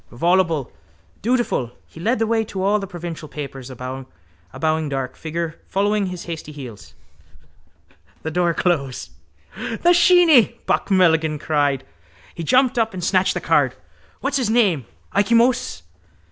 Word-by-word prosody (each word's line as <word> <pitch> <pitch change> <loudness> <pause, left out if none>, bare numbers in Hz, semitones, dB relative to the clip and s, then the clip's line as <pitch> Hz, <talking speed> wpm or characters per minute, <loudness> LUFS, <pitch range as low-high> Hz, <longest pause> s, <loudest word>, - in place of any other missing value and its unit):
Voluble, 165 0 +1 0.5
dutiful, 230 - 0
he - - -15
led 230 +9 +1
the 225 - +1
way 225 0 +1
to 190 -3 -5
all 205 +2 +3
the 195 - -5
provincial 170 -3 -7
papers, 135 -3 -7
a 130 - -8
bowing 130 - -4
dark 135 -2 -3
figure 165 0 -4
following 205 +1 +1
his 180 -1 -6
hasty 160 -3 -6
heels. 125 -8 -10 1.3
The 160 - -3
door 175 0 +1
closed. 140 -8 -1 0.4
—The 350 - +1
sheeny! 345 - +5
Buck - - 0
Mulligan 160 -5 +3
cried. 145 -3 0 0.5
He - - -7
jumped 255 - +3
up 225 -3 0
and 180 - -5
snatched 185 +1 +2
the - - 0
card. - - +2 0.5
—What's - - 0
his 250 -5 0
name? 200 - +2 0.2
Ikey 205 +4 +2
Moses? 240 - +2
170 Hz, 145 wpm, -21 LUFS, 145-215 Hz, 1.3 s, sheeny